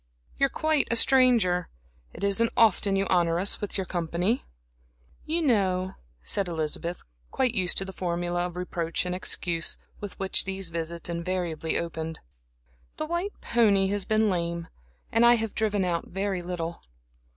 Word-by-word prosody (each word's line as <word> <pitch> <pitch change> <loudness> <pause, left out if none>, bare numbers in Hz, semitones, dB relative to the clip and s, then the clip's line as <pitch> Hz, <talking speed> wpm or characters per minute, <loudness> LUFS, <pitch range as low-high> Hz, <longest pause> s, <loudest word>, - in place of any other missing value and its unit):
You're 275 - +4
quite 310 0 +2
a 235 - +3
stranger. 230 -9 +4 0.4
It - - -9
isn't 200 +3 +2
often 205 -3 +4
you 195 0 +1
honor 170 -2 +3
us 190 +3 +1
with 205 - -3
your 190 - -2
company." 175 +6 -1 0.8
"You 330 +2 0
know," 190 -8 +1 0.3
said 195 - -1
Elizabeth, 165 +1 -3 0.3
quite 255 -3 +1
used 185 -5 +1
to 195 - +1
the 190 - -8
formula 175 0 -1
of 175 - -10
reproach 175 -1 -2
and 180 - -2
excuse, 175 -2 -1 0.2
with 205 -2 -7
which 195 -1 +2
these 195 -2 -3
visits 170 0 -4
invariably 170 -2 -2
opened 160 -1 -4 0.8
"the 310 - -2
white 345 +5 -3
pony 200 -5 +3
has 205 0 0
been 215 0 +2
lame, 170 -3 -2 0.4
and 230 +1 +3
I 240 0 +7
have 225 -2 -3
driven 210 -3 0
out 170 -2 -1
very 195 -1 -2
little." 170 -1 -5
185 Hz, 155 wpm, -27 LUFS, 170-215 Hz, 0.8 s, I